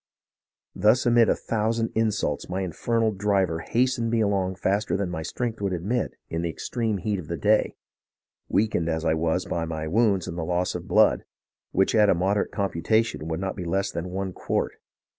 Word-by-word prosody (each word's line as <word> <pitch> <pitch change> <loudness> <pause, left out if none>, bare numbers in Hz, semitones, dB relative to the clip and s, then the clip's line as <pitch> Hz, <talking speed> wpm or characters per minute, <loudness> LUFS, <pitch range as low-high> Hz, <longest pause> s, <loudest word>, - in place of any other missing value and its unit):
Thus 110 +6 +3
amid 120 -1 +5
a - - +3
thousand 115 +1 -1
in 110 0 +2
sults 105 -1 -2
my 95 +2 -2
infernal 110 +5 0
driver 95 -4 +1
hastened 120 +3 0
me 115 0 +1
along 100 -3 +1
faster 100 +3 0
than 95 -3 -2
my 80 -2 -3
strength 115 +7 -3
would 100 -2 0
admit 105 +8 -2
in 80 - -3
the 85 - -1
extreme 110 +5 -2
heat 100 +1 -2
of 80 - -8
the 85 - -3
day, 105 +4 +2 0.7
weakened 100 -6 +1
as 80 0 -1
I - - +3
was 80 +2 0
by 85 -1 -2
my 80 -1 -4
wounds 100 0 +2
and 85 - -5
the - - -2
loss 90 +2 0
of 90 0 -6
blood, 105 +1 +4 0.5
which 95 - +2
at 105 -2 +5
a - - +4
moderate 95 +4 +1
computation 100 -1 0
would 80 0 -2
not 95 0 -3
be 90 - -5
less 95 +4 -1
than 85 +2 -4
one 95 0 -3
quart. - - -2
95 Hz, 195 wpm, -25 LUFS, 85-110 Hz, 0.7 s, amid